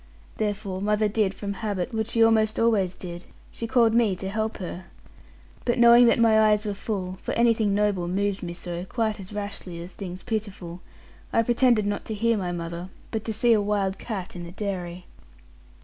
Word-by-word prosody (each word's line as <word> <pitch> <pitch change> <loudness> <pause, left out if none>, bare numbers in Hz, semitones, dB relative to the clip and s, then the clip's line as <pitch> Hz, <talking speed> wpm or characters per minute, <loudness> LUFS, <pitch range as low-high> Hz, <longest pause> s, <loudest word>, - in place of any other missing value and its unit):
Therefore, 205 -3 -2
mother 210 +1 +2
did, 210 -2 +1
from 200 -1 -4
habit, 200 -3 -3
what 220 -1 -1
she 230 0 +3
almost 220 -1 +3
always 205 -6 +2
did, 175 -1 -8 0.3
she 230 - -5
called 230 -2 +4
me 225 -5 +3
to 190 +1 -5
help 220 +2 -2
her. 185 -1 -6 0.8
But 240 - +1
knowing 235 0 +8
that - - +4
my 225 -2 +5
eyes 210 0 +2
were 205 - -1
full 190 -3 -4
for - - -3
anything 225 -3 +3
noble 205 -4 +1
moves 200 +2 0
me 175 -1 -5
so, 175 0 -5
quite 220 0 -1
as 195 0 -9
rashly 200 -4 -5
as 175 +2 -8
things 185 -2 -7
pitiful 200 -6 -4 0.5
I 230 - +3
pretended 240 -2 +3
not 205 0 -2
to 220 - -4
hear 230 +2 +2
my 185 -4 -2
mother, 170 +1 -5 0.2
but 220 -2 -2
to 225 - -2
see 230 +2 +3
a 215 - +3
wild 200 -2 0
cat 195 -7 -5
in 175 - -6
the 170 - -8
dairy. 180 -3 -5
205 Hz, 195 wpm, -25 LUFS, 185-220 Hz, 0.8 s, knowing